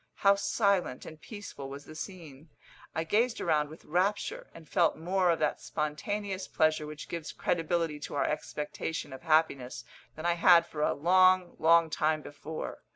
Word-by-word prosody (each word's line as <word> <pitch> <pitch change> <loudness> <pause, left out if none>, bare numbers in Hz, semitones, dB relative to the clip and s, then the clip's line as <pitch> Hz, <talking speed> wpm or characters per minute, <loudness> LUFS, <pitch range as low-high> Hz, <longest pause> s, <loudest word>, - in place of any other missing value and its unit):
How 200 0 +5
silent 200 -1 0
and 155 -1 -11
peaceful 205 - -8
was 140 +1 -9
the - - -11
scene! 160 -4 -9 0.5
I 160 - 0
gazed 225 +8 +1
around 150 -3 +1
with 155 - -13
rapture, 185 +6 -1
and 165 -2 -14
felt 170 +2 +2
more 180 +2 +1
of 165 - +3
that 150 - -1
spontaneous 190 +6 -3
pleasure 155 -1 +1
which 150 0 -8
gives 165 -2 -5
credibility 165 -2 -1
to 145 - -6
our 140 - +1
expectation 150 0 -4
of 130 - -9
happiness 155 -5 +1 0.3
than 155 - -7
I 175 - +3
had 170 0 +6
for 150 -3 -6
a - - +2
long, 185 +3 +4
long 165 0 +5
time 155 0 +1
before. 155 +2 -7
165 Hz, 165 wpm, -30 LUFS, 150-185 Hz, 0.5 s, had